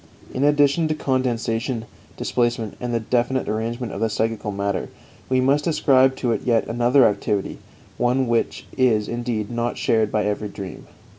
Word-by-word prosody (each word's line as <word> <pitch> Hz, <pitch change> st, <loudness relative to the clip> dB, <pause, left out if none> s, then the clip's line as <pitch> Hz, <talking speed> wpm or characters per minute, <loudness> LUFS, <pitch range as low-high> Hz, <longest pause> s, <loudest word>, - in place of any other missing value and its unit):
In 130 Hz, -, -1 dB
addition 145 Hz, +2 st, +3 dB
to 155 Hz, -, -1 dB
condensation, 125 Hz, -3 st, -1 dB, 0.3 s
displacement, 120 Hz, -3 st, -1 dB
and 120 Hz, -2 st, -2 dB
definite 125 Hz, +1 st, +1 dB
arrangement 115 Hz, +3 st, -3 dB
of 100 Hz, -, -5 dB
the 115 Hz, -, +2 dB
psychical 110 Hz, -1 st, -1 dB
matter, 100 Hz, -1 st, -2 dB, 0.4 s
we 130 Hz, 0 st, +3 dB
must 140 Hz, +4 st, +2 dB
ascribe 135 Hz, -4 st, +4 dB
to 125 Hz, -2 st, -1 dB
it -, -, -1 dB
yet 115 Hz, -2 st, +2 dB
another 120 Hz, +3 st, +3 dB
activity 105 Hz, -1 st, -2 dB, 0.4 s
one 125 Hz, +2 st, +2 dB
which 115 Hz, -1 st, -1 dB
is, 115 Hz, -5 st, +2 dB
indeed, 120 Hz, -2 st, -3 dB
not 120 Hz, 0 st, -2 dB
shared 110 Hz, -2 st, +1 dB
by 105 Hz, -, +1 dB
every 105 Hz, 0 st, -2 dB
dream. 95 Hz, -3 st, -8 dB
120 Hz, 155 wpm, -22 LUFS, 110-130 Hz, 0.4 s, ascribe